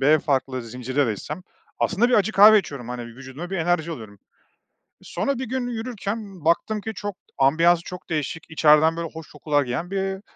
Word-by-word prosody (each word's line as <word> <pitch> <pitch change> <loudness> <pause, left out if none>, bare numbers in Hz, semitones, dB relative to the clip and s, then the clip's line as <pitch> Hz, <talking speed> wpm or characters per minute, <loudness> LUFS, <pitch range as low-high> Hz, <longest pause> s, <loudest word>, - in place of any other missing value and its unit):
B 150 +3 +5
farklı 130 -3 -1
zincire 125 +4 -1
de 110 - 0
gitsem 150 - -7 0.4
aslında 215 +5 +2
bir 250 - +3
acı 210 +1 +3
kahve 215 +2 +8
içiyorum, 140 - -6
hani, 125 -1 -5
vücuduma 130 +8 -9
bir 195 - -2
enerji 170 -1 0
alıyorum. 110 -9 -8 0.8
Sonra, 280 -3 -2
bir 260 - -3
gün 250 +1 -2
yürürken 215 -6 -5
baktım 205 +5 +1
ki 220 - -5
çok, 205 -2 -5 0.2
ambiyansı 165 +5 +4
çok 180 0 -9
değişik, 160 +1 -3
içeriden, 155 +1 +5
böyle, 170 -1 -3
hoş 160 -1 -10
kokular 150 -1 0
gelen 130 +8 -4
bir 195 0 -2
165 Hz, 180 wpm, -23 LUFS, 140-195 Hz, 0.8 s, kahve